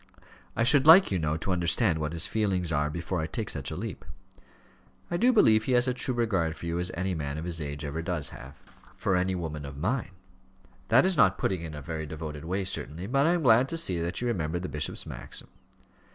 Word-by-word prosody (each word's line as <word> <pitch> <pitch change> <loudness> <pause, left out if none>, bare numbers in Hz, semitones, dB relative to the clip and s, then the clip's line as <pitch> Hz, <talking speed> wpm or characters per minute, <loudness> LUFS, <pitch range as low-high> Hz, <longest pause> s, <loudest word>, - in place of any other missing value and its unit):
I - - +1
should 140 +3 +4
like, 175 - +8
you 95 - +1
know, 75 0 -1
to 90 +4 -3
understand 85 0 +1
what 75 -1 -2
his 85 0 +3
feelings 95 -6 -1
are 75 0 +1
before 85 +2 -3
I 80 - -2
take 105 +6 -3
such 70 -3 -3
a - - -5
leap." - - -6 1.1
"I 175 - 0
do 245 +6 +4
believe 110 - +4
he 130 - 0
has 125 +1 +3
as 125 - +1
true 125 0 -1
a - - -8
regard 95 -9 0
for - - -9
you 85 +1 -2
as 90 +1 0
any 95 +2 -1
man 75 -3 -4
of 80 - -5
his 85 -2 -3
age 75 0 -5
ever 75 +3 -3
does 85 -3 -2
have 65 +4 -11 0.2
" - - -23
"For 95 - 0
any 90 +1 +1
woman 80 -4 -5
of 70 0 -8
mine. 100 - -2 0.7
That 120 - +5
is 190 -2 +1
not 100 -8 +4
putting 95 -3 -1
it 85 - -5
in 80 - -8
a 75 - -8
very 80 0 -5
devoted 75 0 -7
way 95 +3 -1
certainly; 85 -2 -5
but 135 +7 +2
I 170 - +4
am 175 -2 -1
glad 125 +1 +5
to 165 - -2
see 95 - +2
that 85 +6 -3
you 125 - -1
remember 85 -7 -1
the 90 +1 -4
bishop's 75 - -3
maxim." - - -8
90 Hz, 245 wpm, -28 LUFS, 80-115 Hz, 1.1 s, like